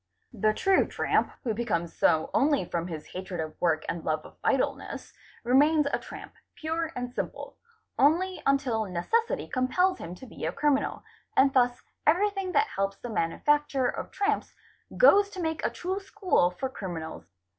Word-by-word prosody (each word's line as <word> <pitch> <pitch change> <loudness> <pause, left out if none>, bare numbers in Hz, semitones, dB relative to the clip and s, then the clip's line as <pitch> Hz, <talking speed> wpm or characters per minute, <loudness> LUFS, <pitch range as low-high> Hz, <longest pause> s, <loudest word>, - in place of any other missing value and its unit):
The 215 -1 +2
true 385 - +3
tramp, - - +1
who 235 -4 0
becomes 205 -7 -2
so 160 0 +2
only 285 -7 +3
from 170 0 -3
his 160 -3 -6
hatred 185 -1 -5
of 155 -1 -3
work 160 -3 +1
and 170 -1 -3
love 155 -1 -1
of - - -13
idleness, 270 -2 -1 0.3
remains 290 +5 +4
a - - +2
tramp, - - -10 0.2
pure 325 +1 -2
and 245 0 -4
simple, - - -5 0.4
only 355 +6 +3
until 255 -5 +2
necessity 195 - -1
compels 360 +9 +1
him 175 - -7
to 260 - -11
be 235 - -10
a 160 - 0
criminal, 290 +6 0 0.3
and 270 0 +5
thus 245 -1 +2 0.2
everything 390 +3 +2
that 430 - +4
helps 195 0 -2
the 245 - -7
manufacture 275 - +1
of - - -5
tramps, 415 +1 -1 0.4
goes 410 -5 +6
to 385 - -9
make 320 -2 -2
a - - +2
true 375 +2 -3
school 390 - +1
for 180 +9 -4
criminals. 175 -10 -6
260 Hz, 165 wpm, -28 LUFS, -, 0.4 s, goes